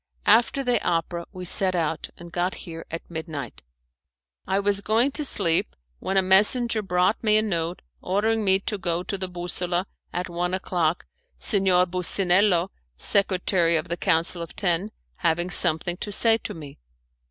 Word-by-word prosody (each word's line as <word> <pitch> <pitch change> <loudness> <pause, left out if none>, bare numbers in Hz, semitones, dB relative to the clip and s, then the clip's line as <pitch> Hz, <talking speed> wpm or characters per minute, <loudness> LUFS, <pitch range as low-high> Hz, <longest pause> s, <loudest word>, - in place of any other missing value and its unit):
After 240 +4 +3
the 245 -1 0
opera 170 0 -2
we 185 -2 -8
set 185 +1 +6
out, 165 -2 -2
and 170 0 -12
got 180 +1 -2
here 165 -2 -9
at 165 - -7
midnight. 160 -7 -7 0.9
I 190 +1 0
was 200 0 0
going 225 +7 +1
to 300 - +1
sleep 170 - +3 0.2
when 195 - -2
a 190 - +4
messenger 215 +5 +4
brought 185 +2 0
me 215 -1 +4
a 215 - +2
note 170 -4 -3 0.2
ordering 215 +4 0
me 190 -1 +3
to 210 0 -4
go 175 -1 -2
to 195 - -4
the 190 -1 -4
Bussola 175 0 -2 0.3
at 180 +1 -4
one 175 +1 -2
o'clock, 175 -3 -2 0.3
Signor 190 -4 +2
Bussinello, 185 +1 +1 0.3
Secretary 185 - +1
of 155 +2 -5
the 170 - -1
Council 165 +1 0
of 165 - -8
Ten, 180 +1 -1 0.3
having 175 +1 -1
something 175 0 +2
to 205 - -6
say 225 +2 +2
to - - -7
me. 145 -4 -11
180 Hz, 165 wpm, -24 LUFS, 170-200 Hz, 0.9 s, set